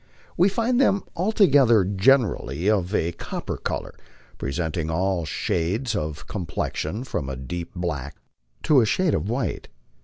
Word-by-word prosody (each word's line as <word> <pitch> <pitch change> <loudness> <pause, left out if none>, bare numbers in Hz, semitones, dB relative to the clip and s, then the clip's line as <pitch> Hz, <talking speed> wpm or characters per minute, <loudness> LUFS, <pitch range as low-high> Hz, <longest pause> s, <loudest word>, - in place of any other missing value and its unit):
We 180 +4 +4
find 240 +5 +1
them, 200 -7 +3
although 145 - +4
generally 95 - +2
of 100 -2 +1
a 85 - +1
copper - - -5
color, - - -4 0.5
presenting 80 +3 -2
all 90 +1 0
shades 95 - -1
of 75 0 -4
complexion 90 +2 -3
from 70 - -3
a 65 - -4
deep 85 +7 -6
black 75 -6 -3 0.5
to 145 -4 +5
a - - +3
shade 180 - +2
of 85 +7 -1
white. 120 0 -2
95 Hz, 135 wpm, -24 LUFS, 80-135 Hz, 0.5 s, to